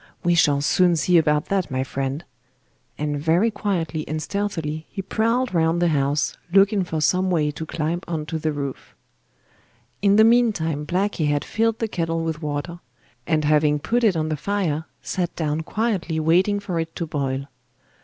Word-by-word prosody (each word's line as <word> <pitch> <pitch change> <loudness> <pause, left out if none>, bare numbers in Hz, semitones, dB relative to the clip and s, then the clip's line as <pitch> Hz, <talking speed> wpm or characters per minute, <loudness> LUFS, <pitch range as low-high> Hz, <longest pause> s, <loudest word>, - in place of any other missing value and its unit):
We 175 -1 +3
shall 145 -4 +3
soon 175 +4 +3
see 170 +2 +4
about 150 -2 +1
that, 195 -3 0
my 130 0 -1
friend,' 135 +3 -4 0.7
and 145 -1 -2
very 170 +9 +2
quietly 175 -7 -2
and 155 +1 -2
stealthily 160 -3 -3
he 195 - -5
prowled 230 +4 0
round 165 0 +2
the 175 -1 +3
house 145 -1 0 0.2
looking 195 +1 +4
for 160 -3 -3
some 185 +5 +2
way 155 -4 +1
to 160 +2 -7
climb 165 +2 -2
on 160 -3 -3
to 160 +1 -4
the 155 0 -1
roof. 140 -2 -6 1.1
In 200 0 +4
the 220 - +7
meantime 205 -11 +2
Blacky 180 -3 0
had 145 0 0
filled 225 0 0
the 225 - -1
kettle 165 -4 -2
with 160 -1 -3
water, 150 +3 -4 0.5
and 155 -2 +1
having 150 0 +3
put 235 +11 0
it 200 -7 +3
on 155 0 -1
the 155 - -1
fire, 160 -2 -1 0.2
sat 180 -2 -2
down 155 -1 -1
quietly 190 -4 -1
waiting 180 +6 +3
for 185 -4 -3
it 165 0 -4
to 170 - -3
boil. 140 -3 -2
165 Hz, 175 wpm, -23 LUFS, 150-195 Hz, 1.1 s, the